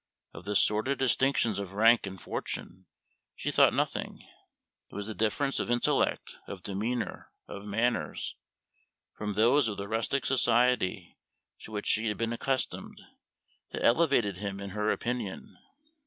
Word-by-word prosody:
Of 80 - -10
the 105 0 -2
sordid 110 +8 +3
distinctions 130 -4 +2
of 100 -2 -6
rank 115 +1 +5
and 95 -1 -7
fortune 95 +2 -5 0.5
she - - -2
thought - - +6
nothing; - - -2 0.6
it - - -14
was 105 - -4
the 110 - -5
difference 110 +7 0
of - - -2
intellect, 120 0 +1
of 95 -2 -8
demeanor, 110 +5 -3 0.2
of 100 +1 -8
manners, 115 +4 -1 0.8
from 105 -1 -4
those 120 +5 +4
of 105 - -3
the 100 - -5
rustic 115 +5 -1
society 120 -7 +2 0.4
to - - -11
which 105 -1 -4
she 110 +1 +2
had 105 - -1
been 115 0 -1
accustomed, 130 +3 -2 0.7
that - - -3
elevated 120 - +3
him 100 -1 -4
in 100 -1 -6
her 105 +2 -1
opinion. 120 -5 -3
110 Hz, 145 wpm, -29 LUFS, 100-120 Hz, 0.8 s, thought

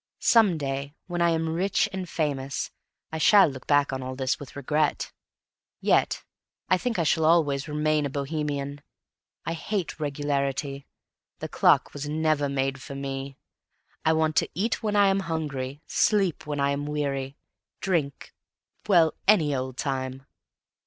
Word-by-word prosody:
Some 215 -8 +4
day, 140 0 -4
when 175 -1 -3
I 170 - +4
am 165 -1 0
rich 195 +5 +1
and 185 -2 -4
famous, 140 -4 -2 0.4
I 160 - -3
shall 200 +4 +7
look 130 -3 -8
back 145 -1 +3
on 130 - -3
all 130 0 -5
this 130 -1 -1
with 145 - -10
regret. 150 +2 0 0.7
Yet - - +2 0.5
I 185 - +4
think 245 0 -2
I 170 - +2
shall 160 +1 +2
always 155 -3 +3
remain 150 0 +1
a - - -7
Bohemian. 145 0 -3 0.6
I 165 - -1
hate 170 +1 -3
regularity. 140 -1 -2 0.5
The - - -6
clock - - +3
was 145 0 -5
never 155 -2 +1
made 135 -1 -1
for 140 0 -8
me. 135 0 -5 0.7
I 160 - +4
want 160 -1 +1
to - - +3
eat 215 +6 0
when 210 -1 -1
I 205 -1 +6
am 195 0 +3
hungry, 150 -5 -4
sleep 195 -8 +1
when 145 -1 -2
I 140 0 +2
am 145 +1 -2
weary, 140 -2 -2 0.4
drink 160 -7 -2 0.5
well, 170 -6 +5
any 165 -9 +5
old 130 -1 -3
time. 130 -1 -3
145 Hz, 155 wpm, -26 LUFS, 140-165 Hz, 0.7 s, shall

